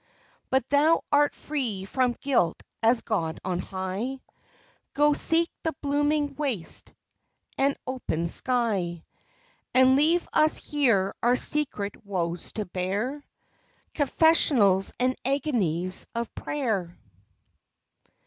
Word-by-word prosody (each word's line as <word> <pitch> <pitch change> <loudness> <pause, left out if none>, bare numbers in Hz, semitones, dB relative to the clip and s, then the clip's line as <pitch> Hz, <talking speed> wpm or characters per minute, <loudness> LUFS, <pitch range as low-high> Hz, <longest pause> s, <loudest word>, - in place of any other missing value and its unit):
But 265 -1 +1
thou 300 +3 +4
art 290 0 +3
free 240 -11 -4
from 250 +4 0
guilt 255 -12 0 0.2
as 230 +1 +3
God 165 -7 -2
on 180 -1 -1
high; 190 +9 -4 0.8
Go, 295 +1 +4
seek 330 +3 +2
the 320 -1 -2
blooming 290 +1 0
waste 265 - -3 0.6
and 275 +1 +1
open 250 -11 -3
sky, 195 -7 +1 0.7
And 260 0 +6
leave 320 +5 +2
us 310 0 +4
here 230 -10 +1
our 240 +1 +3
secret 250 -8 -2
woes 175 -4 -3
to 215 - -3
bear, 200 +11 -3 0.7
Confessionals 275 - +4
and 255 +1 +1
agonies 205 - 0
of 235 0 -3
prayer. 215 -12 -3
250 Hz, 105 wpm, -26 LUFS, 190-290 Hz, 0.8 s, And